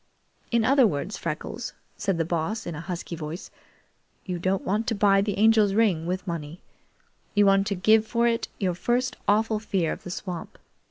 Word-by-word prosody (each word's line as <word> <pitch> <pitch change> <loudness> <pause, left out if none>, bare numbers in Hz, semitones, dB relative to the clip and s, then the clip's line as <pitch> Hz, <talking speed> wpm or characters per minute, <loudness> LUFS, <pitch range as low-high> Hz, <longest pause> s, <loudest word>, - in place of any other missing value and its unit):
"In 235 -2 +2
other 265 -1 +5
words, 185 +4 -3
Freckles," 170 +8 -5 0.2
said 195 -3 -1
the 165 - 0
Boss 175 +7 -2
in 170 - -4
a 150 - -6
husky 175 -1 -5
voice, 160 +3 -7 0.7
"you 180 -2 -3
don't 185 +2 0
want 210 +4 0
to 230 - +1
buy 195 -1 +4
the 205 -1 -2
Angel's 215 -2 +4
ring 190 -8 +2
with 185 +1 -2
money. 165 -2 -5 0.8
You 205 0 +5
want 195 0 +4
to 200 - 0
give 215 +4 +4
for 235 +1 +2
it 230 -1 0
your 185 -3 0
first 245 +8 0
awful 215 +1 +2
fear 190 -6 -1
of - - -5
the - - -8
swamp. 180 -1 -6
195 Hz, 185 wpm, -26 LUFS, 175-220 Hz, 0.8 s, other